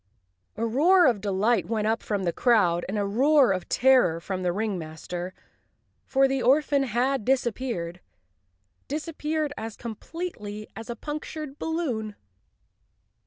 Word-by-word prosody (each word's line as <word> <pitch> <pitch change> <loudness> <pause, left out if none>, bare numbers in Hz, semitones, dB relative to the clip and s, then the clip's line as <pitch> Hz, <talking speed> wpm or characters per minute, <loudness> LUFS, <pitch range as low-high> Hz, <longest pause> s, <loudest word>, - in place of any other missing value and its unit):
" 90 - -45
A 230 - 0
roar 335 +11 +5
of 230 -7 +3
delight 205 +2 +1
went 220 -2 -1
up 225 +1 +1
from 205 -2 -2
the 170 -2 0
crowd, 180 -9 +3
and 205 - -2
a 205 - 0
roar 265 +5 +4
of 185 -2 -3
terror 250 -11 +4
from 185 +2 -4
the 180 -1 +1
ringmaster, 180 -3 -4 0.8
for 270 0 +4
the 270 0 -1
orphan 285 +2 +3
had 255 0 0
dis¬ 260 +3 +2
appeared—disappeared 210 - -5
as 220 0 -6
completely 220 - -6
as 225 +1 -8
a 235 - -3
punctured 300 +1 -6
balloon! 250 -11 -2
225 Hz, 135 wpm, -26 LUFS, 190-270 Hz, 0.8 s, roar